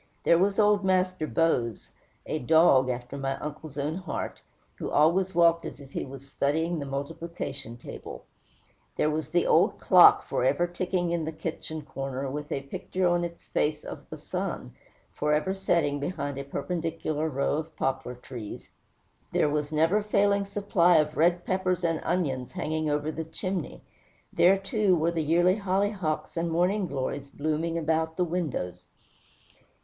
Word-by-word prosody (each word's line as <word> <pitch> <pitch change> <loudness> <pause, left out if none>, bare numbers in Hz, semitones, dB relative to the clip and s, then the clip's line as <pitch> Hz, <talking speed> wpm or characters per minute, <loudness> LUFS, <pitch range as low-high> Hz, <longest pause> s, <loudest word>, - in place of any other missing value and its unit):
There 170 - +5
was 195 +2 +2
old 210 -1 +4
Master 185 -3 +1
Bose, 125 - 0 0.3
a 155 - -2
dog 135 -2 +5
after 125 +2 -4
my 135 0 -2
uncle's 150 0 -7
own 150 +4 -1
heart, 185 - -5 0.4
who - - -3
always 175 +5 +3
walked 170 -1 +4
as - - -7
if 140 -1 -13
he - - -3
was 135 0 -10
studying 160 +5 0
the 140 - -5
multiplication 140 -3 -5
table. - - -9 0.7
There 155 - +2
was 155 +1 -3
the 175 0 +2
old - - +3
clock, - - +7
forever 140 +7 +2
ticking 175 0 -1
in 170 -1 0
the 160 - -3
kitchen 160 -1 -5
corner, 135 -1 -4
with 150 +1 -5
a 135 - -2
picture 180 +6 -3
on 175 0 +2
its 170 0 -6
face 150 0 -1
of - - -9
the - - -7
sun, 60 - -4 0.4
forever 150 +5 +1
setting 170 -7 +1
behind 145 -3 -3
a 140 - -5
perpendicular 160 +1 -2
row 140 +1 0
of 160 +1 -6
poplar 130 -1 -2
trees. 120 -3 -9 0.6
There 150 - +2
was 150 0 -1
the 155 - -5
never 165 +7 +3
failing 200 -1 +2
supply 195 -4 +3
of 150 0 +1
red 175 +2 +2
peppers 185 -1 0
and 165 -2 +1
onions 135 -8 -1
hanging 155 -3 -1
over 150 +1 0
the 160 - -4
chimney. 180 +1 -5 0.5
There, 190 +3 +5
too, 195 -1 +2
were 165 +1 +1
the 165 -1 -1
yearly 175 +5 +3
hollyhocks 195 -5 -1
and 170 0 0
morning 180 +4 +1
glories 140 0 -3
blooming 155 +4 -2
about 160 0 0
the 180 - +2
windows. 125 - -3
160 Hz, 160 wpm, -27 LUFS, 145-180 Hz, 0.7 s, clock